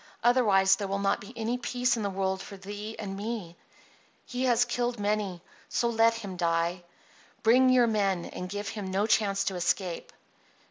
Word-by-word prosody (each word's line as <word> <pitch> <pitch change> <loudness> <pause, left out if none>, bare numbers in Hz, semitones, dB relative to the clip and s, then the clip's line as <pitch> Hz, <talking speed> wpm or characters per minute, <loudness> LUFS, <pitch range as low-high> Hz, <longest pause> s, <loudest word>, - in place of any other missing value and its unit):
"Otherwise 210 -6 +4
there 200 - -3
will 195 +1 -1
not 200 0 0
be 200 - -10
any 230 +2 -2
peace 250 0 0
in 225 - -3
the 200 - -1
world 190 0 -1
for 200 - -9
thee 205 +3 -7
and 195 -2 -5
me. 205 -4 -5 0.7
He 255 -1 -2
has 245 -1 +4
killed 240 -1 -2
many. 205 -4 -1 0.4
Let 230 -1 +3
him 210 -4 -6
so 185 - -8
die. 170 +1 0 0.6
Bring 255 +3 +5
your 255 -1 +5
men, 195 -6 0
and 180 - -6
give 205 +2 -4
him 205 -3 -5
no 195 +2 +1
chance 200 -3 +2
to 195 - -2
escape." 180 0 -1
205 Hz, 180 wpm, -28 LUFS, 190-230 Hz, 0.7 s, Bring